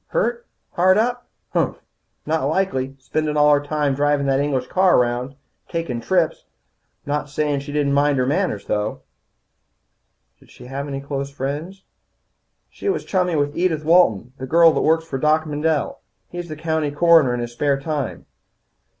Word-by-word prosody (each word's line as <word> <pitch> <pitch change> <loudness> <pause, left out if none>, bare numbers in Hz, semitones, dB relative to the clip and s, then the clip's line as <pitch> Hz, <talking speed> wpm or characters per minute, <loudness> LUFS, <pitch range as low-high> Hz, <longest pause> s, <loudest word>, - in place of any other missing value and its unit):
"Hurt, 485 -1 -1 0.2
hard 185 +2 +3
up? 245 +2 0 0.3
Humph! - - 0 0.5
Not 155 -3 0
likely, 140 -5 -1
spendin' 150 +3 -2
all 150 0 +5
her 145 - +3
time 145 -1 0
drivin' 145 0 +1
that 135 0 +2
English 140 -3 0
car 185 +6 +3
around. 125 +2 0 0.3
Takin' 165 -9 -3
trips. 170 +5 0 0.6
I'm 145 - -4
not 145 0 -2
sayin' 145 0 -1
she 140 +1 -8
didn't 145 -1 0
mind 145 0 +3
her 130 - +1
manners, 145 - -1
though." 105 +1 -2 1.4
"Did - - -22
she - - -14
have 135 +3 -5
any 135 -1 -4
close 140 0 -4
friends?" 145 +8 -5 0.9
"She - - -4
was 390 - -1
chummy 180 -3 0
with 145 0 0
Edith 165 -3 0
Walton, 130 - +3
the 130 - -5
girl 165 +3 +6
that - - 0
works 160 +1 +2
for 135 -5 -4
Doc 155 +2 +2
Mendel. 150 0 -1 0.3
He's 175 -2 -7
county 160 -1 -1
coroner 155 -4 +4
in - - -3
his 120 0 -4
spare 140 +3 0
time. 145 -3 -4
150 Hz, 165 wpm, -21 LUFS, 135-165 Hz, 1.4 s, girl